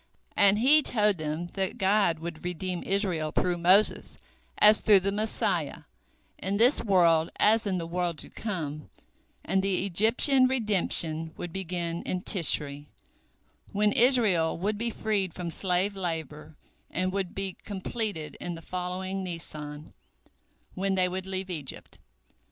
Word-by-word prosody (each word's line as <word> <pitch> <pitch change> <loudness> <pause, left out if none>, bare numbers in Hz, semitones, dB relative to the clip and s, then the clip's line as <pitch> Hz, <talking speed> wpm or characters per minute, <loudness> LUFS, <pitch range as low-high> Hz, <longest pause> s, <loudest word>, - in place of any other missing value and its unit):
And 200 0 +4
he 280 +7 +4
told 210 - +2
them 155 +2 -4
that 195 +3 -3
God 195 -4 +2
would 165 0 -8
redeem 180 0 -4
Israel 185 -6 -2
through 175 +1 -1
Moses 185 +5 +2 0.4
as 210 +1 +6
through 205 -3 +5
the 200 +2 -2
Messiah, 215 +2 -2 0.6
in 195 +1 -2
this 245 +6 +4
world 170 -6 +3
as 220 0 +3
in 190 -2 -1
the 170 - -4
world 175 -1 -3
to - - -10
come, 155 -9 -6 0.6
and 190 - 0
the 195 -1 -1
Egyptian 230 - +5
redemption 175 -9 +2
would 175 -2 -7
begin 175 -2 -4
in 180 0 -4
Tishri, 145 -5 +1 0.9
when 210 +1 +2
Israel 220 -10 +3
would 205 +4 -2
be 235 +1 -1
freed 205 -5 -2
from 175 -2 -5
slave 190 +3 -1
labor, 160 -4 -6 0.3
and 185 +1 -2
would 190 -2 -4
be 195 -1 -4
completed 200 -5 -5
in 175 - -5
the 165 - -12
following 185 +2 -5
Nisan, 155 -4 -8 0.8
when 195 +1 -1
they 185 -1 +2
would 185 +1 -6
leave 190 0 -5
Egypt. 150 -6 -7
185 Hz, 140 wpm, -27 LUFS, 165-205 Hz, 0.9 s, as